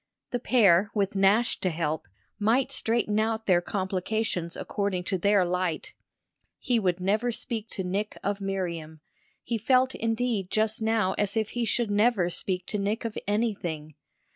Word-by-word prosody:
The 245 - -1
pair, 205 -6 +4
with 200 -1 0
Nash 200 +4 +3
to 185 - 0
help, 160 - -2 0.3
might 245 +6 +2
straighten 225 -4 0
out 220 0 0
their 175 -3 +4
complications 190 -1 -2
according 200 -3 -2
to 190 +1 -1
their 200 0 +4
light. 180 -2 -2 0.6
He 245 -2 +1
would 185 -3 0
never 210 +6 +1
speak 225 -1 -4
to 190 - -4
Nick 200 +4 -2
of 200 0 -1
Miriam; 170 -5 -4 0.4
he 230 -1 -2
felt 255 +3 +3
indeed 225 -4 -1
just 220 +1 +1
now 220 -4 +2
as 205 +1 0
if 220 -1 0
he 240 -1 -1
should 225 0 0
never 205 -4 +3
speak 180 +1 -3
to 210 - -3
Nick 210 +4 -1
of 225 - -3
anything. 185 -8 -2
205 Hz, 160 wpm, -27 LUFS, 185-225 Hz, 0.6 s, pair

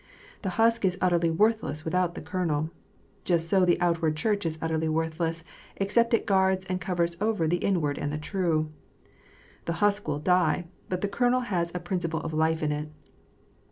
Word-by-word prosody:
The 195 - -2
husk 230 0 +3
is 185 -1 +2
utterly 175 -3 +2
worthless 185 -4 +1
without 175 +1 0
the - - -7
kernel. 160 -4 -1 0.5
Just 170 -2 +1
so 190 +1 +3
the 175 -1 +3
outward 165 -3 +1
Church 205 0 0
is 160 -1 -2
utterly 160 0 -1
worthless 165 +1 -1 0.3
except 230 +4 +2
it - - -2
guards 190 -1 +2
and 185 -1 -3
covers 170 0 -1
over 210 -6 +1
the 175 +3 +2
inward 155 -7 0
and 145 - -2
the 150 - -2
true. 155 -2 -1 0.9
The 170 - -1
husk 205 +2 +1
will 150 -1 0
die, 175 +1 +2 0.2
but 185 -1 -2
the 205 - +1
kernel 245 +5 +2
has 175 -8 -1
a - - -1
prin 175 +1 -2
ciple 165 -2 -3
of 160 - -4
life 160 +1 +1
in 150 - +1
it. 150 +1 -3
175 Hz, 185 wpm, -27 LUFS, 160-190 Hz, 0.9 s, husk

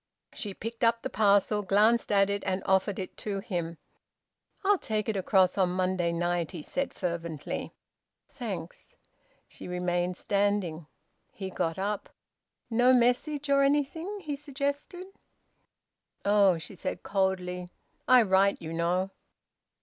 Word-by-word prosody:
She 200 -3 -5
picked 230 +2 -6
up 230 0 +3
the - - -3
parcel, 210 0 +3
glanced 210 +4 +3
at 195 -1 +4
it, 200 0 -1
and 190 0 -1
offered 190 +1 +2
it 185 - -6
to 205 -2 -3
him. 170 -4 -4 0.9
"I'll 400 -1 +4
take 215 -1 -2
it 220 - -1
across 190 -1 +3
on 185 -2 +4
Monday 185 -1 0
night," 175 -1 0
he 170 -5 -7
said 275 - -2
fervently. 170 -3 -4 0.5
"Thanks." - - -7 0.5
She - - -11
remained 180 0 -1
standing; 200 -6 0 0.4
he 190 -1 -6
got 165 -2 -1
up. 200 +2 -2 0.6
"No 245 +2 +4
message 255 +4 +2
or 280 0 +4
anything?" 295 +8 0
he 295 -4 -3
suggested. 285 +5 -4 1.2
"Oh!" 200 -3 +5
she 160 +4 -9
said 175 - -4
coldly, 180 -2 -1 0.4
"I 255 -2 +7
write, 195 0 +3
you 160 0 -6
know." 180 +3 0
195 Hz, 135 wpm, -29 LUFS, 180-235 Hz, 1.2 s, I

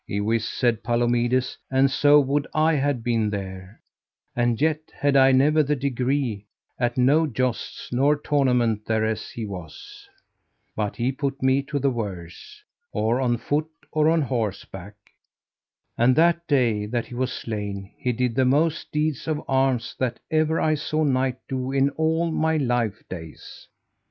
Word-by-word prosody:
Iwis, 110 +2 0
said 120 -3 0
Palomides, 120 +1 +1
and 135 +1 +3
so 145 +2 +5
would 140 +1 0
I 155 +1 +3
had 140 -4 0
been 115 -3 +1
there, 95 0 -7 0.6
and 120 -2 +1
yet 155 +1 +2
had 145 -1 0
I 135 0 +6
never 145 +4 +4
the 150 0 0
degree 130 -5 -1 0.3
at 120 0 0
no 145 +6 +4
jousts 130 -2 -3
nor 140 +4 +3
tournament 125 -7 +1
thereas 110 0 -1
he 115 - -6
was, 90 -7 -10 0.7
but 105 -1 -2
he 125 +2 0
put 135 0 -4
me 130 +1 +3
to 145 +1 -4
the 140 0 +1
worse, 100 - -7 0.3
or 115 +4 0
on 120 -2 +1
foot 150 +6 -1 0.2
or 155 0 +3
on 165 -1 +2
horseback; 105 -5 -4 1.0
and 125 +2 +4
that 170 +2 +3
day 115 -8 +1
that 120 +1 -2
he - - -12
was 125 +1 -1
slain 100 -4 -5
he 125 - -2
did 125 0 -1
the 130 - +2
most 150 +5 +1
deeds 150 -2 -1
of 155 -1 -2
arms 130 -3 0
that 125 -2 -1
ever 155 0 +2
I 155 - +2
saw 155 +1 -1
knight 130 -2 +1
do 130 -1 -3
in 135 +1 +2
all 160 +2 0
my 160 0 +1
life 120 -7 -1
days. 80 -3 -10
130 Hz, 155 wpm, -24 LUFS, 115-145 Hz, 1.0 s, I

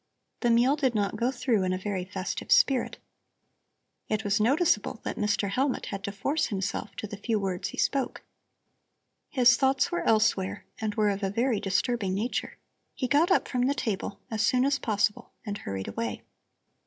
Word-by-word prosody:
The 240 - +1
meal 240 +4 +4
did 265 -6 0
not 200 -2 0
go 240 +1 +1
through 245 -4 0
in 185 0 0
a - - -1
very 190 -1 -3
festive 185 - -5
spirit. 285 - +4 1.1
It 215 0 0
was 205 +1 +1
noticeable 250 - +2
that - - -3
Mr. 205 -1 0
Hellmut 265 +4 0
had 200 -1 -5
to 200 - -3
force 275 +10 -1
himself 200 -1 -3
to - - -5
the 205 -1 -7
few 220 +1 -1
words 190 -3 -2
he - - -9
spoke. 275 -2 0 1.1
His 245 -3 +5
thoughts 270 +5 +2
were 345 - -1
elsewhere 210 -3 +1
and 215 -2 -2
were 210 -2 +3
of 200 +1 -4
a 195 - 0
very 230 +2 +1
disturbing 205 0 0
nature. 225 +5 -2 0.4
He 255 - -1
got 295 +7 +3
up 385 - +3
from 250 -1 0
the 280 - +1
table, 205 -5 -3
as 220 -1 0
soon 255 +2 +3
as 280 0 +1
possible, 215 +2 -1
and 205 -1 -4
hurried 95 -1 -5
away. 110 +1 -4
215 Hz, 180 wpm, -28 LUFS, 200-255 Hz, 1.1 s, His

